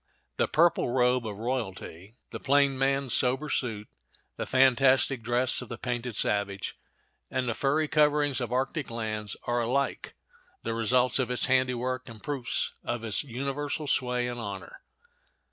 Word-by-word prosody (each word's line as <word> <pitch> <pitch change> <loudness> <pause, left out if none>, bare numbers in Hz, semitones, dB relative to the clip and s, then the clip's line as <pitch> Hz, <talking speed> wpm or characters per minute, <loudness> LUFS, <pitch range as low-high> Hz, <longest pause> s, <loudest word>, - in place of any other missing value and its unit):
The - - +2
purple 165 -4 +3
robe 125 -1 +2
of 105 -2 -6
royalty, 110 -4 -5 0.2
the - - -5
plain 140 0 +3
man's 135 -1 +1
sober 130 +4 +2
suit, 110 -5 -2 0.5
the - - -4
fantastic 130 0 +4
dress 120 +3 0
of 125 - -9
the 120 - -5
painted 120 -2 -3
savage, 100 -2 0 0.5
and 130 -1 -1
the 120 - 0
furry 145 +6 +1
coverings 150 -3 +2
of 120 -1 -3
arctic 135 +3 -1
lands 110 -2 -3
are 120 0 0
alike 135 +4 -1 0.5
the 115 - -2
results 125 +3 +2
of 130 - 0
its 125 - +3
handiwork, 130 -1 0
and 115 -2 -12
proofs 140 -5 -1
of 120 -1 -3
its 110 +3 +1
universal 140 +3 -3
sway 125 -3 0
and 120 0 -5
honor. 100 -5 -7
125 Hz, 150 wpm, -28 LUFS, 115-135 Hz, 0.5 s, fantastic